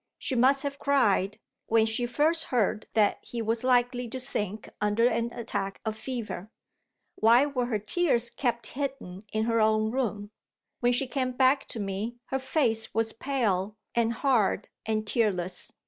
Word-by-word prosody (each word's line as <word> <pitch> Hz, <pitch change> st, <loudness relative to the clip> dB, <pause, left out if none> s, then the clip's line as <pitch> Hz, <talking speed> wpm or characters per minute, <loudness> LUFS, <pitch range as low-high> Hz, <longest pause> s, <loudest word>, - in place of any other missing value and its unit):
She -, -, -3 dB
must 265 Hz, +3 st, +4 dB
have 280 Hz, -1 st, -4 dB
cried, 205 Hz, -8 st, +2 dB, 0.3 s
when 225 Hz, -1 st, +4 dB
she 225 Hz, +2 st, 0 dB
first 315 Hz, +6 st, +2 dB
heard 215 Hz, -3 st, 0 dB
that 210 Hz, -2 st, +3 dB
he 240 Hz, -, -6 dB
was 225 Hz, +1 st, 0 dB
likely 245 Hz, -1 st, +2 dB
to 260 Hz, +3 st, -5 dB
sink 210 Hz, -4 st, -2 dB
under 210 Hz, +3 st, +2 dB
an 235 Hz, -1 st, +1 dB
attack 195 Hz, -4 st, -4 dB
of 220 Hz, -1 st, -1 dB
fever. 220 Hz, -4 st, -5 dB, 0.6 s
Why 235 Hz, +5 st, +5 dB
were 255 Hz, -4 st, -1 dB
her 225 Hz, -3 st, 0 dB
tears 235 Hz, -, +1 dB
kept 235 Hz, -2 st, -1 dB
hidden 260 Hz, -9 st, -5 dB
in 215 Hz, 0 st, 0 dB
her 230 Hz, 0 st, +2 dB
own 215 Hz, 0 st, +2 dB
room? 210 Hz, -5 st, -2 dB, 0.5 s
When 245 Hz, 0 st, +3 dB
she 245 Hz, +2 st, +1 dB
came 255 Hz, -1 st, -2 dB
back 260 Hz, +2 st, +3 dB
to 230 Hz, -, -6 dB
me, 200 Hz, +4 st, -3 dB, 0.2 s
her 265 Hz, -, +1 dB
face 255 Hz, -5 st, 0 dB
was 225 Hz, 0 st, 0 dB
pale 220 Hz, -6 st, -1 dB, 0.2 s
and 230 Hz, -1 st, +2 dB
hard 230 Hz, -6 st, +1 dB, 0.2 s
and 215 Hz, -1 st, 0 dB
tearless. 190 Hz, -5 st, -1 dB
230 Hz, 165 wpm, -28 LUFS, 215-255 Hz, 0.6 s, Why